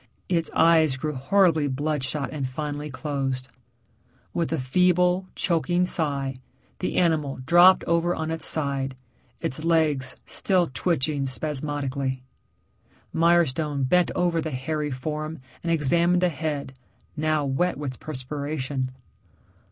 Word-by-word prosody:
Its 170 -2 +1
eyes 160 -4 +4
grew 150 +3 -3
horribly 160 +2 +3
bloodshot 145 0 -2
and 140 -4 -3
finally 150 +2 -4
closed. 135 -1 -3 0.8
With 170 - -1
a 165 - +1
feeble, 180 +6 +2
choking 175 +1 +1
sigh, 140 -6 0 0.4
the 185 - -2
animal 155 -5 +1
dropped 175 +4 +6
over 170 +1 +1
on 160 0 -3
its 160 -2 -1
side, 140 -3 +1 0.5
its 145 +5 -3
legs 155 -5 +1
still 180 -6 +1
twitching 145 -4 0
spasmodically. 140 -2 -3 0.9
Mirestone 160 -4 +2
bent 180 +4 +3
over 175 -2 +1
the 160 - -3
hairy 150 +3 -2
form 155 +4 -4 0.2
and 170 - -2
examined 170 +4 +3
the 180 - +4
head, 150 -4 -4 0.4
now 155 -1 0
wet 140 +5 0
with 135 -4 -5
perspiration. 140 -1 -4
150 Hz, 120 wpm, -25 LUFS, 135-170 Hz, 0.9 s, dropped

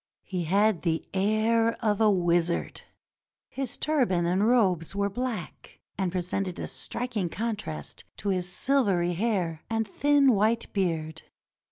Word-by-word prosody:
He 180 -3 -3
had 200 +2 +2
the 165 -2 -1
air 215 +3 +2
of 210 0 +1
a 215 - +6
wizard. 175 -3 +1 0.7
His 270 -3 -3
turban 245 - +1
and 185 +5 +2
robes 195 -8 +2
were 200 0 0
black, 230 -6 -5 0.2
and 190 -3 -1
presented 185 +1 -2
a - - -3
striking 225 -8 -2
contrast 200 - -5
to 205 - -3
his 180 -2 -1
silvery 190 -6 +1
hair 180 -5 -1
and 225 -1 -1
thin 285 +3 +3
white 220 +3 +1
beard. 160 -5 -1
195 Hz, 135 wpm, -27 LUFS, 175-225 Hz, 0.7 s, a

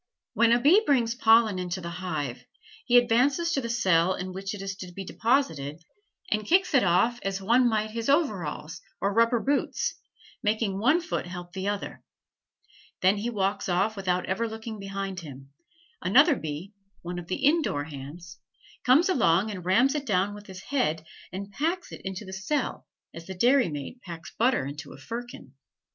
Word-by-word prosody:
When 235 0 +4
a 240 - +5
bee 315 - +6
brings 245 - +2
pollen 225 -4 +4
into 180 +1 -3
the 170 -1 -6
hive, 150 -9 -4 0.4
he 245 0 +6
advances 265 +8 +3
to 275 - 0
the 235 - -4
cell 185 -6 +3
in 185 0 -5
which 195 +3 -4
it 200 - -8
is 195 0 -4
to 185 -3 -8
be 195 +2 -7
deposited 170 - 0 0.5
and 215 0 +1
kicks 365 - +2
it 270 - +5
off 210 +7 +2
as 195 0 -2
one 240 +5 +3
might 215 -1 -1
his 230 +3 -3
overalls 190 - 0 0.2
or 200 +1 0
rubber 230 +2 +3
boots, 280 +4 0 0.5
making 210 -3 0
one 295 - +3
foot 330 - -3
help 175 -1 -8
the 190 +1 -3
other; 205 -1 -4 1.0
then 190 +3 +4
he 220 +4 -2
walks 200 -3 -1
off 195 +5 +1
without 185 -2 -1
ever 230 +5 -1
looking 220 0 -7
behind 195 -1 -4
him; 140 -4 -11 0.5
another 285 - +5
bee, 160 - -6 0.3
one 175 +1 -4
of 170 - -9
the 185 - -1
indoor 290 - +2
hands, 160 +4 -10 0.4
comes 275 +8 +5
along 215 - +3
and 185 -4 -7
rams 240 +9 +4
it 290 -2 -3
down 200 0 +1
with 205 0 -11
his 190 -1 -10
head 160 - -1 0.3
and 195 +2 -6
packs 335 - -2
it - - -9
into 190 +2 -5
the 190 - -9
cell 200 +11 -2 0.3
as 165 0 -10
the 190 - -6
dairymaid 240 - +1
packs 170 -4 -9
butter 240 - +2
into 145 0 -7
a - - -12
firkin. 230 - -8
200 Hz, 180 wpm, -27 LUFS, 180-240 Hz, 1.0 s, bee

